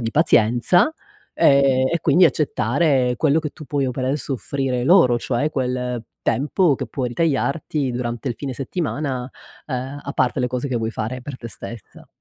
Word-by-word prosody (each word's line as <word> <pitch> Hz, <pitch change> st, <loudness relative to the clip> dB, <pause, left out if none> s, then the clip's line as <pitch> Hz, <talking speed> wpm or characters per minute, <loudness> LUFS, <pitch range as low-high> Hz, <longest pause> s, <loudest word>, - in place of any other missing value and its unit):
di 115 Hz, -1 st, -2 dB
pazienza, 125 Hz, -, +4 dB, 0.4 s
ehm, 135 Hz, -2 st, +4 dB
e 170 Hz, -, +1 dB
quindi 180 Hz, +3 st, +4 dB
accettare 135 Hz, -2 st, +1 dB
quello 155 Hz, 0 st, +3 dB
che 155 Hz, -2 st, -4 dB
tu 155 Hz, -, -12 dB
puoi 140 Hz, +1 st, -1 dB
o -, -, -1 dB
per 130 Hz, 0 st, -3 dB
adesso 135 Hz, +1 st, -1 dB
soffrire 130 Hz, -2 st, -2 dB
loro, 145 Hz, -8 st, +5 dB
cioè 130 Hz, +5 st, -1 dB
quel 125 Hz, -3 st, -2 dB, 0.2 s
tempo 150 Hz, +2 st, +2 dB
che 130 Hz, -, -4 dB
puoi 125 Hz, +2 st, -3 dB
ritagliarti 145 Hz, 0 st, -1 dB
durante 120 Hz, +1 st, -3 dB
il 120 Hz, -, -2 dB
fine 135 Hz, -3 st, -5 dB
settimana, 135 Hz, -, -3 dB, 0.4 s
ehm, 130 Hz, +1 st, -4 dB
a 140 Hz, -, -5 dB
parte 130 Hz, +1 st, +1 dB
le 125 Hz, -, +1 dB
cose 125 Hz, +2 st, -3 dB
che 125 Hz, -, -1 dB
vuoi 115 Hz, -1 st, -2 dB
fare 115 Hz, +4 st, -4 dB
per 135 Hz, 0 st, -7 dB
te 115 Hz, -, -8 dB
stessa. 110 Hz, 0 st, -9 dB
130 Hz, 175 wpm, -21 LUFS, 125-145 Hz, 0.4 s, loro